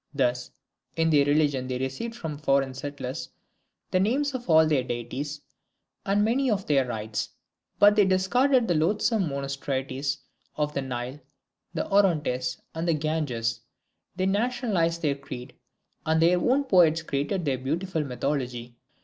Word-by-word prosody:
Thus, 125 -2 0 0.5
in 165 0 +2
their 145 -2 +5
religion 145 -3 +2
they 130 -1 -2
received 135 - -4
from 160 -9 -5
foreign 135 -3 +1
settlers 135 -1 -5 0.6
the 185 - +3
names 275 +9 +1
of 245 -6 -6
all 160 -1 +7
their 150 -4 +2
deities 130 +5 -4 0.7
and 205 +1 +3
many 255 +4 +2
of 200 -3 0
their 135 -3 +2
rites, 110 -2 -3 0.5
but 205 0 +6
they 210 -2 +5
discarded 235 +7 +3
the 175 - +2
loathsome 190 +3 +1
monstrosities 135 0 -3 0.4
of 150 -1 -1
the 140 - -1
Nile, 130 +1 -5 0.6
the - - -1
Orontes, 150 -11 +2
and 165 +2 -3
the 165 - +3
Ganges; 145 -7 -1 0.6
they 185 0 0
nationalized 200 -6 0
their 145 -2 +2
creed; 135 -2 -9 0.5
and 160 0 +2
their 175 +2 +4
own 265 +8 +2
poets 170 - +4
created 160 +5 -2
their 135 -3 0
beautiful 160 +5 -2
mythology. 125 -3 -3
150 Hz, 145 wpm, -26 LUFS, 130-190 Hz, 0.7 s, all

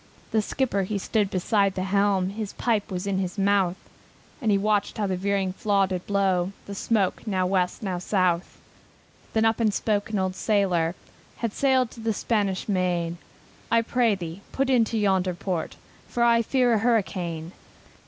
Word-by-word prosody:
The 220 - +3
skipper 220 -2 -1
he 200 +2 -2
stood 205 +1 0
beside 195 +1 +1
the 185 - -1
helm, 195 -1 +2
His 210 -1 -5
pipe 220 -4 0
was 185 -1 -4
in 195 -1 0
his 185 +1 -3
mouth, 195 -2 +2 0.7
And 225 - 0
he 200 - +4
watched 205 0 0
how 210 - 0
the 190 -1 -1
veering 195 0 0
flaw 200 -1 +2
did 185 -1 -4
blow 195 -2 +1
The 200 - -7
smoke 200 +1 0
now 185 -3 +1
West, 180 +2 0
now 185 -3 -2
South. 180 -2 0 0.8
Then 220 0 +3
up 225 +1 +2
and 220 -2 +3
spake 205 0 -1
an 215 - -1
old 185 -1 -1
sailor, 185 -6 +1 0.4
Had 230 -3 -3
sailed 260 -3 +2
to - - -12
the 225 0 0
Spanish 205 -3 -1
Main, 175 -3 0 0.5
"I 230 0 +3
pray 230 -2 +2
thee, 175 0 -7
put 270 0 0
into 230 -3 +2
yonder 190 -3 +1
port, 180 -3 -3 0.3
For 240 - 0
I 235 -1 +5
fear 250 +1 +2
a 220 - +3
hurricane. 185 -8 -1
200 Hz, 175 wpm, -25 LUFS, 185-220 Hz, 0.8 s, I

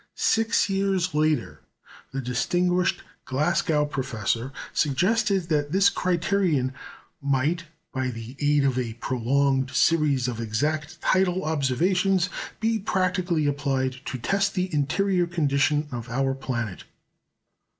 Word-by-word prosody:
Six 225 +1 +2
years 195 -3 0
later, 155 0 0 0.5
the 135 - -3
distinguished 175 +8 0 0.2
Glasgow 150 +2 +1
professor 125 -3 -2 0.2
suggested 195 - +2
that 145 -2 0
this 195 +2 +4
criterion 175 -7 +1 0.5
might, 140 +5 0 0.3
by 130 0 -1
the 115 +1 -7
aid 145 -1 +3
of 130 -2 +1
a 115 -3 -3
prolonged 130 +2 +1
series 140 -2 +2
of 115 -2 -3
exact 150 +9 -2
tidal 185 0 +2
observations, 175 +6 +1 0.3
be 225 0 +1
practically 185 -4 0
applied 135 -2 0
to 130 - -4
test 195 - 0
the 185 -1 -1
interior 175 +5 +1
condition 150 -2 +1
of 120 -1 -6
our 135 +3 0
planet. 120 -7 -4
150 Hz, 115 wpm, -25 LUFS, 130-180 Hz, 0.5 s, this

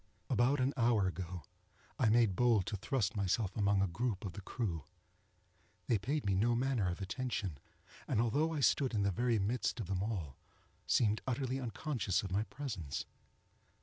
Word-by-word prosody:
About 130 +4 +3
an 130 +2 +2
hour 115 -4 +3
ago, 90 -2 -4 0.6
I 110 - +4
made 110 -4 +4
bold 115 -5 +3
to 110 - -3
thrust 110 0 -1
myself 100 0 0
among 100 -2 +3
a - - +2
group 110 +3 -2
of 95 - -4
the 100 - -7
crew. 95 - -3 1.0
They 115 - +2
paid 140 +7 -1
me 100 - +2
no 115 +5 +3
manner 120 -6 +1
of 90 +3 -4
attention, 95 - -3 0.5
and, - - +1
although 145 +8 +2
I 155 -3 -2
stood 130 -2 +3
in 105 - +2
the 100 - +2
very 120 +4 +1
midst 110 +4 0
of 110 - -2
them 95 0 -2
all, 90 - -3 0.5
seemed 110 -2 +3
utterly 130 +1 -1
unconscious 120 - -1
of 95 - -5
my 100 +3 +2
presence. 105 - -4
110 Hz, 175 wpm, -35 LUFS, 95-125 Hz, 1.0 s, I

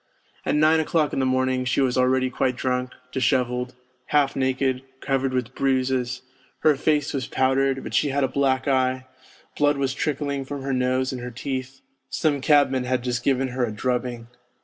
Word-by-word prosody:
At - - +2
nine 155 +2 +4
o'clock 155 -1 +1
in - - 0
the 130 - +1
morning 130 0 +1
she 125 - 0
was 130 -2 +2
already 130 0 +2
quite 125 0 0
drunk, 125 0 -1 0.2
dishevelled, 125 0 0 0.3
half 145 -2 +2
naked, 130 -1 0 0.2
covered 135 -1 0
with 125 -1 -2
bruises, 130 -2 0 0.4
her 155 -2 +5
face 150 +1 +1
was 130 -4 -2
powdered, 135 0 +1
but - - -7
she 145 - +2
had 140 +1 0
a - - +3
black 130 0 0
eye, 130 -1 +1 0.5
blood 145 -1 +3
was 135 -1 0
trickling 140 -1 -2
from 140 0 -6
her 135 0 -2
nose 130 0 +1
and 125 - -5
her 125 - -5
teeth; 130 +2 -5 0.3
some 145 -3 0
cabman 135 -3 +3
had 125 -1 -1
just 120 -1 -2
given 135 -1 +1
her 125 0 -2
a 115 - -1
drubbing. 120 +1 -2
130 Hz, 180 wpm, -24 LUFS, 125-140 Hz, 0.5 s, her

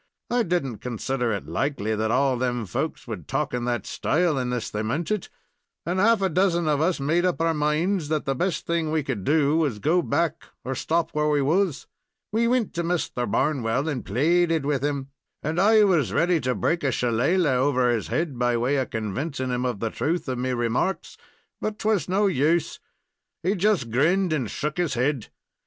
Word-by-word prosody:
I 245 0 +3
did 175 -7 0
n't 120 -5 -6
consider 125 0 -2
it 100 -3 -3
likely 110 - -1
that 110 +1 -1
all 130 +3 +2
of 125 - -3
them 120 -2 -1
folks 90 - -4
would - - -6
talk - - -1
in 120 -1 -2
that 120 -4 -1
style 170 0 +1
unless 125 -3 -2
they 105 - -2
meant 145 - -2
it, 210 -4 -2 0.6
and 180 +2 -1
half 220 0 +4
a 190 - +2
dozen 175 -1 +1
of 150 -1 +2
us 170 0 +1
made 160 +6 +1
up 180 -2 0
our 165 0 +2
minds 155 +3 0
that 155 -2 -1
the 135 - +1
best 175 +6 -2
thing 170 -2 0
we 155 -1 +1
could 125 -8 -3
do 150 +3 +3
was 150 -8 +1
to - - -11
go 165 - +2
back, 170 -1 -1 0.2
or 130 - -2
stop 165 +5 -1
where 150 0 +1
we 145 -2 +2
was. 165 +1 +1 0.5
We 230 +2 +2
wint 245 -3 +1
to 170 - -2
Misther 165 -8 -1
Barnwell 135 -1 0
and 140 -6 -2
plaided 165 - +2
with 140 -2 0
him, 140 -2 -2 0.3
and 155 +3 -1
I 215 +1 +6
was 180 -8 +2
ready 175 0 +2
to 125 0 0
break 170 -1 0
a 135 - +2
shillalah 130 +8 +1
over 130 -2 +2
his 115 -3 -1
head 155 -6 -2
by 120 -1 +2
way 130 +5 +1
of 130 - -1
convincin' 130 - -3
him 125 +1 -1
of 120 -5 -3
the 115 -1 -1
truth 170 +2 -2
of 130 -1 -2
me 130 +1 -1
remarks, 120 +9 -1 0.5
but 215 - -2
it 215 - -10
was 210 -7 +1
no 200 +3 +2
use. 165 -2 +1 0.6
He 185 +4 +2
just 190 - +1
grinned 170 +8 +2
and 130 -8 -1
shook 150 +2 -3
his 170 -6 0
head. 125 -1 -1
150 Hz, 210 wpm, -25 LUFS, 125-175 Hz, 0.6 s, I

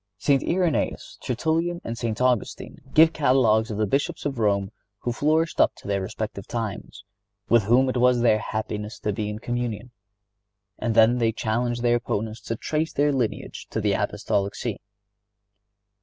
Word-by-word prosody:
St. 135 +5 +2
Irenæus, 175 -3 -1
Tertullian 165 +7 -1
and 115 - -4
St. 115 -2 -3
Augustine 125 -4 -1
give 160 +1 +6
catalogues 125 -6 +3
of 105 - -4
the 110 - +2
Bishops 140 +8 -1
of 135 -4 -2
Rome 100 -2 +1 0.3
who 120 - -1
flourished 155 +6 +1
up - - +3
to - - -13
their 100 -1 0
respective 100 +1 -5
times, 110 -3 -5 0.5
with 115 -4 +4
whom 125 +5 +4
it 130 - -1
was 125 0 +4
their 110 -3 +4
happiness 105 0 -4
to 105 - -1
be 105 +1 -3
in 105 - -4
communion, 120 0 -4 0.9
and 115 -2 -1
then 115 +2 +5
they 115 -1 +2
challenged 120 +2 -1
their 120 0 +4
opponents 110 -1 -3
to 115 - -2
trace 155 +7 -2
their 145 0 +2
lineage 125 -5 -3
to - - -2
the - - +1
Apostolic 100 0 -1
See. 115 -5 -4
120 Hz, 165 wpm, -24 LUFS, 110-130 Hz, 0.9 s, give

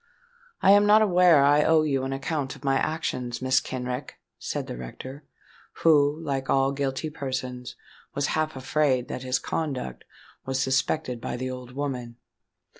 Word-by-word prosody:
"I 195 - +7
am 205 +1 +6
not 215 +1 +6
aware 180 -4 +5
that 140 -1 +5
I 145 +1 +5
owe 160 -1 +4
you 135 -3 0
an 135 - -3
account 140 0 -3
of - - -16
my 135 -1 +2
actions, 125 -6 -2
Mrs. 130 0 +2
Kenrick," 125 +1 -5 0.2
said - - -3
the - - -6
rector, 130 - -9 0.6
who, 150 -1 +5
like 135 -3 -3
all 135 0 +3
guilty 140 +2 -2
persons, 130 -3 -5 0.4
was 140 0 0
half 155 -1 -1
afraid 130 -1 0
that - - -4
his 130 0 0
conduct 130 - -4 0.4
was 130 0 -2
suspected 130 -1 0
by - - -4
the 130 +1 -3
old 125 -1 -8
woman. 125 -4 -4
135 Hz, 165 wpm, -26 LUFS, 130-150 Hz, 0.6 s, I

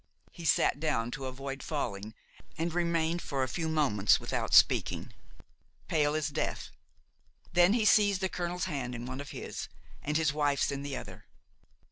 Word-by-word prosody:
He 170 - -10
sat 145 -1 +3
down 120 -7 0
to 135 -1 -5
avoid 135 +1 -6
falling 110 -8 -4 0.4
and 165 0 -1
remained 170 -1 0
for 135 -2 -2
a - - 0
few 160 +5 -2
moments 125 -11 +3
without - - -3
speaking, - - +4 0.7
pale 150 -1 +2
as 155 -1 0
death; - - -3 0.8
then 175 +3 +5
he 225 -2 +2
seized 205 -2 +5
the 190 - +2
colonel's 180 -1 -3
hand 135 -8 -3
in 120 +1 -6
one 130 +2 -5
of 145 - -9
his - - -6 0.3
and 150 +1 0
his 155 -3 +1
wife's 145 -2 +1
in 140 0 -3
the 140 -1 -4
other. - - -9
150 Hz, 165 wpm, -30 LUFS, 135-170 Hz, 0.8 s, then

